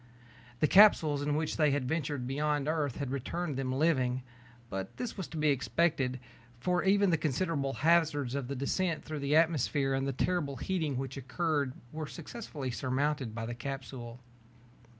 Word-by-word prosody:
The 155 - +5
capsules 160 -7 +6
in 145 0 0
which 155 0 -1
they 150 -2 +4
had 140 -2 0
ventured 145 -4 -2
beyond 145 +2 0
Earth 155 -5 0
had 140 -3 -3
returned 145 +4 -3
them 130 -1 -2
living. 130 -3 +1 0.4
But 95 -3 -5
this 245 -2 -4
was 190 -4 -5
to 160 - -8
be 155 0 +3
expected, 135 0 +1 0.4
for 180 +6 +1
even 200 0 +4
the 165 - +2
considerable 145 -2 0
hazards 155 -6 +2
of 140 -3 -2
descent 165 +5 -1
through 155 -1 -4
the 140 +1 +1
atmosphere 150 -4 +2
and 135 0 0
the - - +1
terrible 145 0 0
heating 155 -1 -1
which 135 0 -4
occurred 140 +1 -1 0.2
were 155 -1 -5
successfully 155 - -6
surmounted 130 -1 -1
by 115 -1 -3
the 120 - -4
capsule. 125 -1 -6
145 Hz, 165 wpm, -31 LUFS, 130-160 Hz, 0.4 s, capsules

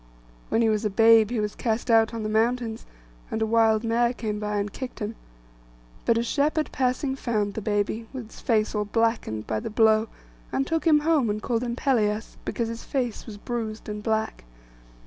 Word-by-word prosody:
When 230 - +2
he 225 - +3
was 215 0 0
a 210 - +1
babe 225 +1 +6
he 240 -2 -1
was 210 -1 -1
cast 230 +1 -1
out 225 -1 +5
on 230 -2 -4
the - - -1
mountains, 225 +1 0 0.4
and - - -2
a 220 - +2
wild 220 0 +3
mare 235 +1 +2
came 215 -4 -3
by 210 0 -2
and 205 0 -2
kicked 260 -2 -6
him. 210 +1 -4 0.9
But 230 - +3
a 230 - +1
shepherd 300 +5 0
passing 260 +1 0
found 215 -6 -1
the 220 - -4
baby, 210 +2 -1
with 255 -3 -6
its 215 - -14
face 220 -2 +1
all 210 -1 0
blackened 225 - 0
by 110 -1 -1
the - - -5
blow; 220 0 +4 0.4
and 270 - 0
took 325 +2 -1
him 300 -2 +5
home, 300 -7 +2
and 210 +1 -1
called 230 +1 -1
him 240 -1 -2
Pelias, 220 -5 0
because 235 - -2
his 230 0 -6
face 245 -6 -3
was 210 -2 -8
bruised 220 -1 -5
and 210 0 -5
black. 220 0 -1
225 Hz, 205 wpm, -25 LUFS, 215-240 Hz, 0.9 s, babe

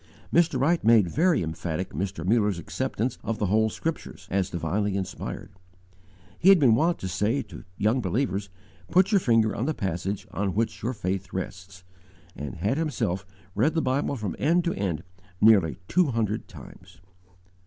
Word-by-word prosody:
Mr. 165 -6 +3
Wright 165 +6 +2
made 110 -4 +5
very 165 - +2
emphatic 80 +2 -4
Mr. 90 +1 -3
Muller's 105 -2 +2
acceptance 115 +7 -3
of 115 - -2
the 105 - 0
whole 110 +3 +2
Scriptures, 110 -8 -5
as 95 -1 +1
divinely 95 +4 -1
inspired. 95 0 -5 0.9
He 185 - +5
had 195 - +9
been 135 -8 +5
wont 165 +9 +2
to 95 - -3
say 105 +9 0
to 105 - -12
young 110 +5 +2
believers, 100 -1 -1 0.4
"Put 185 +3 +4
your 200 - +5
finger 115 - +2
on 120 - -2
the 155 - -1
passage 95 +2 -3
on 100 -2 -2
which 115 +2 -1
your 120 +3 -1
faith 95 -3 -3
rests," 95 0 -6 0.5
and 70 -3 -6
had 105 - -1
himself 100 - -2 0.3
read 140 +11 +1
the 165 - +2
Bible 135 +2 0
from 105 -8 -4
end 170 +5 +3
to 170 - 0
end 95 -5 -2 0.4
nearly 105 -7 +5
two 180 -2 +3
hundred 115 -4 -1
times. 90 0 -14
105 Hz, 165 wpm, -26 LUFS, 95-130 Hz, 0.9 s, had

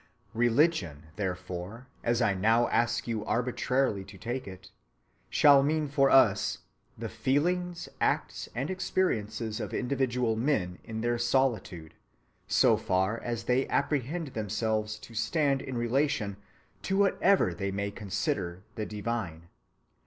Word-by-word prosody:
Religion, 115 - +2
therefore, 95 +3 -5 0.2
as 120 +1 +2
I 100 - +3
now 115 +5 +3
ask 120 0 +1
you 110 -3 -2
arbitrarily 125 -2 0
to 100 0 -12
take 120 +4 -4
it, 95 -1 -11 0.6
shall 140 -2 +6
mean 150 +2 +1
for 135 -1 +3
us 105 -7 +4 0.4
_the - - -3
feelings, 175 +5 0
acts, - - 0
and 135 +8 -2
experiences 115 - -1
of - - -4
individual 125 -3 0
men 110 -8 0
in 110 0 -5
their 120 0 0
solitude, 115 -10 0 0.5
so - - +4
far 95 +5 0
as 120 -2 -4
they 125 +3 +1
apprehend 150 +3 -1
themselves 110 -1 -2
to 115 - -13
stand 140 +4 +1
in 130 -2 -5
relation 120 -4 0 0.4
to 195 - -1
whatever 195 - +3
they 100 +3 -3
may 100 +1 -2
consider 95 -3 -3
the 110 - -4
divine_. 105 -6 -4
115 Hz, 130 wpm, -29 LUFS, 105-135 Hz, 0.6 s, shall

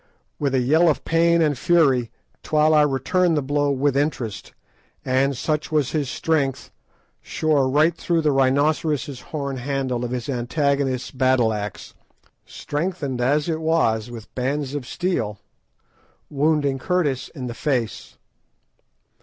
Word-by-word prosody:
With 140 -2 0
a - - +3
yell 155 +7 +4
of 150 - -1
pain 170 0 +3
and 150 -2 +1
fury 135 -6 +2 0.3
Twala 150 -1 +3
returned 160 +5 +1
the 145 - 0
blow 145 +1 0
with 140 0 +1
interest, 125 -8 -2 0.5
and, 135 +1 +1
such 150 +3 -2
was 150 -4 +1
his 145 -5 -1
strength, 140 -4 -1 0.5
shore 145 -4 +1
right 155 +5 +3
through 170 -1 0
the 155 -1 +2
rhinoceros' 140 0 +1
horn 140 -3 -4
handle 130 -1 -2
of 120 - -3
his 125 -1 -4
antagonists 135 0 -1
battle 130 -3 +2
axe, 105 -2 -6 0.5
strengthened 145 -5 -3
as 145 +5 +1
it 160 -1 -2
was 125 -9 +1
with 115 -3 -10
bands 135 +2 -2
of 140 -4 -5
steel, 125 - -2 0.9
wounding 145 -2 +1
Curtis 150 -5 0
in 130 -4 -5
the 120 - -4
face. 115 - -3
140 Hz, 135 wpm, -22 LUFS, 130-155 Hz, 0.9 s, yell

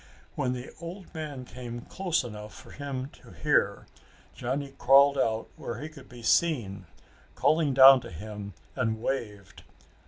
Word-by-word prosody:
When 125 -1 -1
the 125 0 -7
old 175 +3 -9
man 150 -5 -6
came 120 -1 -7
close 180 +2 -1
enough 105 -3 -8
for - - -13
him 140 -2 -5
to - - -16
hear, - - +1 0.5
Johnny 135 +3 -3
crawled 140 +2 +6
out 115 -4 0
where 115 -1 -5
he 150 +3 -6
could 150 -4 -14
be 120 -1 -12
seen, 115 - +1 0.5
called 155 -4 +2
down 135 0 +9
to - - -9
him, 100 +2 -8 0.2
and 110 0 -1
waved. 105 -6 -4
130 Hz, 150 wpm, -28 LUFS, 110-140 Hz, 0.5 s, down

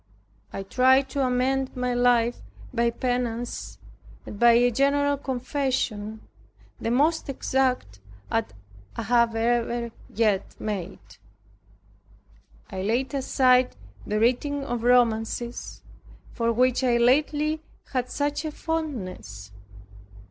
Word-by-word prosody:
I 195 - -5
tried 260 +6 +3
to 275 0 -1
amend 260 +1 0
my 250 -1 -1
life 245 -1 +2 0.3
by 235 -1 +2
penance, 245 -1 -3 0.5
and 205 - -8
by 235 0 +7
a 245 +1 +4
general 285 +3 +2
confession, 255 -5 -2 0.6
the - - -2
most 295 +6 +2
exact 255 - -1 0.3
that 225 -1 0 0.4
I 235 +2 +2
ever 235 +1 0 0.2
yet 210 -3 +2
had - - -31
made. 185 - -6 1.5
I 190 - -4
laid 240 +8 -1
aside 255 -2 +3 0.3
the 210 +1 0
reading 275 +5 +1
of 240 -2 -3
romances, 240 -1 +1 0.5
for 230 -1 0
which 255 +2 +2
I 245 -2 +3
lately 300 +5 +2 0.3
had 250 -1 -1
such 290 +1 -1
a 310 - -3
fondness. 185 - -5
245 Hz, 110 wpm, -25 LUFS, 230-265 Hz, 1.5 s, by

